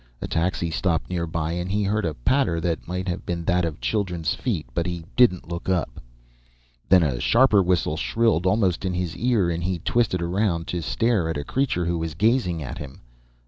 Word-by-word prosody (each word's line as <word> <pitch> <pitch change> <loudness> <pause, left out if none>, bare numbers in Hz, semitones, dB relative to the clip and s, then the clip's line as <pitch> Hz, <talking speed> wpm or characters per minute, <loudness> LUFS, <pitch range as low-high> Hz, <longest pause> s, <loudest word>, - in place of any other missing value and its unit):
A - - -4
taxi 85 0 -1
stopped 85 +1 -1
nearby 85 -2 -2
and 90 +2 -3
he 105 +1 +1
heard 105 +1 0
a 80 -3 -2
patter 85 - +1
that 85 0 -2
might 90 +2 -3
have 90 - -3
been 85 -1 -4
that 90 0 +2
of 80 -3 -4
children's 90 -7 -1
feet, - - -2
but 85 +7 -1
he 85 -2 -4
didn't 115 -10 +4
look 85 +2 -5
up. 85 -10 -1 0.9
Then 90 -2 +6
a 65 -6 0
sharper 115 - +4
whistle 90 -4 +1
shrilled 110 -2 +1
almost 95 -3 +1
in 95 -2 -1
his 90 -2 -2
ear 115 -8 +1
and 85 +1 -3
he 90 0 -1
twisted 90 0 0
around 85 -1 0
to 90 - -2
stare 110 -2 +1
at 80 - -2
a 70 - -3
creature 120 - 0
who 85 0 -1
was 80 -2 -4
gazing 100 - +1
at 65 - -6
him. 70 -2 -9
90 Hz, 200 wpm, -24 LUFS, 85-100 Hz, 0.9 s, Then